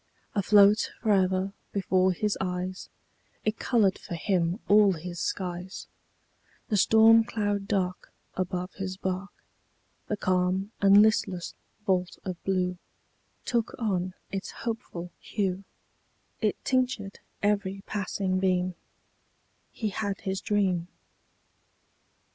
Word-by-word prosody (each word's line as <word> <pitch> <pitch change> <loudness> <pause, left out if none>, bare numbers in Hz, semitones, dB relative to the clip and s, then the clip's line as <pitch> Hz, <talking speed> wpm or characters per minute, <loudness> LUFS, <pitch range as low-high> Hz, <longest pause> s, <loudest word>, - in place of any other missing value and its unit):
Afloat 205 +1 +5
fore'er 190 -2 +2 0.2
before 190 -1 +2
his 210 +3 0
eyes, 185 0 -3 0.6
It 215 +1 0
colored 210 -6 +2
for 175 - -6
him 175 +1 0
all 205 -1 +6
his 175 +1 -6
skies: 180 0 -4 0.8
The 215 - +1
storm 225 +3 +7
cloud 205 -3 -2
dark 185 -3 -1 0.2
Above 180 0 -3
his 190 -1 -5
bark, 190 +1 -3 0.8
The 210 - -1
calm 185 +2 0
and 200 +1 +8
listless 195 -5 +1 0.3
vault 180 -2 0
of 185 -2 -5
blue 180 -2 0 0.7
Took 235 -2 0
on 185 -5 -1 0.2
its 195 0 -4 0.2
hopeful 200 -7 -4
hue, 195 -2 -2 0.8
It - - +2
tinctured 250 -6 0 0.2
every 200 -1 0
passing 195 -2 -1
beam 185 -1 +1 1.0
He 220 - -2
had 200 0 -3
his 190 -1 -2
dream. 190 -5 +1
195 Hz, 105 wpm, -28 LUFS, 185-205 Hz, 1.0 s, and